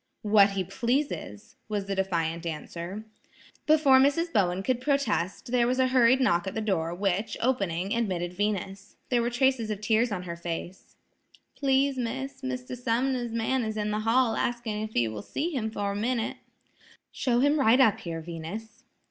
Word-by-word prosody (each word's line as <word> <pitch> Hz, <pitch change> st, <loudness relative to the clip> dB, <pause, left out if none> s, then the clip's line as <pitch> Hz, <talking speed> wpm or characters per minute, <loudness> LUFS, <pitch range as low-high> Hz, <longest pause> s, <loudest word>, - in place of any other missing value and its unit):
"What 205 Hz, -2 st, +5 dB
he 195 Hz, -1 st, -1 dB
pleases," 240 Hz, -, -3 dB
was 205 Hz, -2 st, -2 dB
the 200 Hz, -, -3 dB
defiant 170 Hz, -4 st, -1 dB
answer. 170 Hz, +5 st, -6 dB, 0.6 s
Before 300 Hz, -4 st, +6 dB
Mrs. 330 Hz, +5 st, +2 dB
Bowen 185 Hz, -1 st, +1 dB
could 250 Hz, +2 st, 0 dB
protest, 245 Hz, -, -1 dB
there 245 Hz, -1 st, +3 dB
was 255 Hz, +1 st, +1 dB
a 260 Hz, 0 st, +3 dB
hurried 255 Hz, 0 st, +5 dB
knock 175 Hz, -9 st, +2 dB
at 190 Hz, -, -4 dB
the -, -, -1 dB
door, 185 Hz, -7 st, -1 dB
which, 200 Hz, +3 st, -1 dB
opening, 195 Hz, -7 st, 0 dB
admitted 185 Hz, -7 st, -1 dB
Venus. 195 Hz, 0 st, -3 dB
There 245 Hz, -2 st, +2 dB
were 235 Hz, -, 0 dB
traces 245 Hz, -2 st, +1 dB
of 210 Hz, -2 st, -3 dB
tears 220 Hz, +2 st, +2 dB
on 185 Hz, -3 st, -3 dB
her 170 Hz, -1 st, -5 dB
face. 170 Hz, +2 st, -6 dB, 0.6 s
"Please, 270 Hz, -1 st, +1 dB
Miss, 265 Hz, +3 st, -4 dB
Mr. 255 Hz, -1 st, -4 dB
Sumner's 245 Hz, 0 st, -1 dB
man 230 Hz, +3 st, 0 dB
is 220 Hz, -1 st, -3 dB
in 210 Hz, 0 st, -1 dB
the 210 Hz, -, -1 dB
hall 225 Hz, +2 st, +2 dB
asking 235 Hz, -3 st, -2 dB
if 215 Hz, 0 st, -6 dB
you 115 Hz, -2 st, +2 dB
will 105 Hz, -1 st, -6 dB
see 320 Hz, -, -3 dB
him 235 Hz, -7 st, -2 dB
for 205 Hz, -2 st, -2 dB
a -, -, -4 dB
minute." 230 Hz, +2 st, -1 dB, 0.7 s
"Show 240 Hz, -2 st, 0 dB
him 290 Hz, +2 st, +3 dB
right 250 Hz, -1 st, +5 dB
up 220 Hz, -4 st, +4 dB
here, 165 Hz, -6 st, -5 dB
Venus." 175 Hz, +8 st, -8 dB
220 Hz, 175 wpm, -27 LUFS, 195-255 Hz, 0.7 s, Before